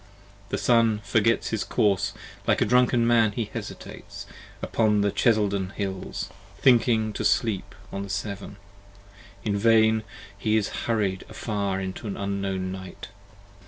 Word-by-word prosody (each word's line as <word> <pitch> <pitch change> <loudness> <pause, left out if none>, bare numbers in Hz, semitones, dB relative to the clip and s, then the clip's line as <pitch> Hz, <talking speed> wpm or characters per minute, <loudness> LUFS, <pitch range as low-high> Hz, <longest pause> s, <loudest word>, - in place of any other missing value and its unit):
The - - -1
Sun 115 -3 +3
forgets 115 +2 +2
his 110 - -1
course, 100 -4 +1 0.3
like - - +3
a - - +3
drunken 125 -1 +4
man 115 -3 +4
he 115 +1 -1
hesitates, - - -8 0.4
75 - - -16
Upon 105 -2 +2
the 100 0 +2
Cheselden 100 -5 +1
hills, 95 -2 -4 0.3
thinking 115 -4 +3
to - - -3
sleep 110 -5 +1 0.2
on 100 - -3
the 100 - -6
Severn. 100 +1 -4 0.9
In 105 -2 0
vain: 110 +1 +4 0.3
he 110 +2 +1
is 105 - 0 0.2
hurried 100 -5 0
afar 100 -3 -2
into 95 +3 -5
an 100 - -4
unknown 100 -2 -2
Night. 95 0 -8
105 Hz, 140 wpm, -26 LUFS, 100-115 Hz, 0.9 s, drunken